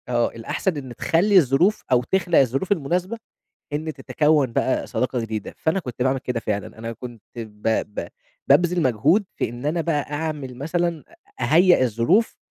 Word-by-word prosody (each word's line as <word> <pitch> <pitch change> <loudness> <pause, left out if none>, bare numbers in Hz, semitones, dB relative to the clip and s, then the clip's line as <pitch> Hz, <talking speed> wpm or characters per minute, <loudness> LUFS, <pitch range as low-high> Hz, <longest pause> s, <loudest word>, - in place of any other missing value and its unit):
آه. 120 -1 +2
الأحسن 150 +9 -2
إن 130 -4 -7
تخلّي 190 - +3
الظروف 170 - +3
أو 125 -1 +4
تخلق 175 +4 +2
الظروف 135 - 0
المناسبة 180 +5 0 0.6
إن 155 +2 -2
تتكون 145 -1 +1
بقى 130 - 0
صداقة 125 -1 -1
جديدة، 110 -2 -5
فأنا 160 +4 0
كنت 125 -8 -7
باعمل 130 +1 +1
كده 125 -2 -3
فعلًا، 105 0 -4
أنا 115 +1 -5
كنت 120 -2 -10
ب 110 -2 -5 0.3
ب - - -7 0.4
بابذل 175 0 +4
مجهود 140 - +3
في - - -1
إن 120 +4 -7
أنا 165 +3 0
بقى 150 -3 -1
أعمل 145 -4 -4
مثلًا 170 +3 -1 0.4
أهيأ 175 -2 +5
الظروف 125 - +2
145 Hz, 160 wpm, -23 LUFS, 120-170 Hz, 0.6 s, أهيأ